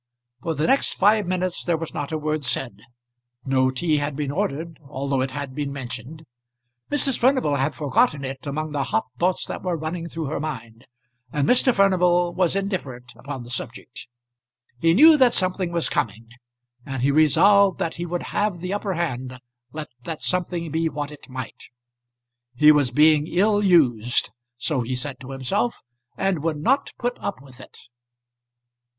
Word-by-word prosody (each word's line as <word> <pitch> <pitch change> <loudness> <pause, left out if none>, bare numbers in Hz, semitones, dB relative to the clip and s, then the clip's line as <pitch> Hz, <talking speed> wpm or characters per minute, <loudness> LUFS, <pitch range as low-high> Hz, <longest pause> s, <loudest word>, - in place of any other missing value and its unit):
For 165 -1 -2
the 150 - 0
next 270 +10 +2
five 205 0 +3
minutes 185 -1 -1
there 170 -2 +1
was 165 0 -6
not 145 -2 -4
a 160 - -1
word 155 0 -2
said. 130 -1 -1 0.7
No 130 -1 +2
tea 155 +4 0
had 145 0 -2
been 145 -1 -2
ordered, 165 -2 -3
although 135 -1 -1
it 130 - -1
had 140 0 -6
been 145 0 -3
mentioned. 135 +3 -7 0.7
Mrs. 280 -3 +1
Furnival 250 - +2
had 140 +3 -1
forgotten 150 - +1
it 130 +2 -7
among 155 +2 -3
the 140 -2 -1
hot 220 +1 0
thoughts 180 +1 +1
that - - -6
were 180 -2 -2
running 165 +2 -4
through 165 -1 -4
her 145 +1 -3
mind, 120 -7 -7 0.4
and 145 0 0
Mr. 255 +1 +4
Furnival 180 -4 +3
was 185 0 +1
indifferent 145 - -4
upon 135 -2 -7
the 120 - -10
subject. 125 -1 -6 0.7
He 165 +4 +3
knew 310 +6 +8
that 255 -3 +5
something 185 -1 0
was 170 -1 +1
coming, 115 +2 -2 0.5
and 135 -2 -4
he 140 - +3
resolved 190 +6 +5
that 165 - -2
he 175 +1 -4
would 175 +1 -3
have 205 -3 -1
the 180 +3 -4
upper 200 -2 -2
hand 130 -6 -3 0.3
let 155 +1 -6 0.2
that 160 -2 -5
something 175 -3 -1
be 160 +1 0
what 150 -1 -5
it 150 - -13
might. 130 -2 -7 0.9
He 150 +4 +7
was 145 -4 +3
being 150 +3 +4
ill 205 +4 +2
used, 125 - +3 0.3
so 130 +2 -1
he 125 +2 -3
said 130 +1 -5
to 130 -1 -10
himself 130 -2 -2 0.3
and 195 -3 0
would 160 -1 -1
not 260 - +1
put 245 0 -3
up 200 - -4
with 130 -2 -16
it. - - -14
155 Hz, 175 wpm, -23 LUFS, 135-180 Hz, 0.9 s, knew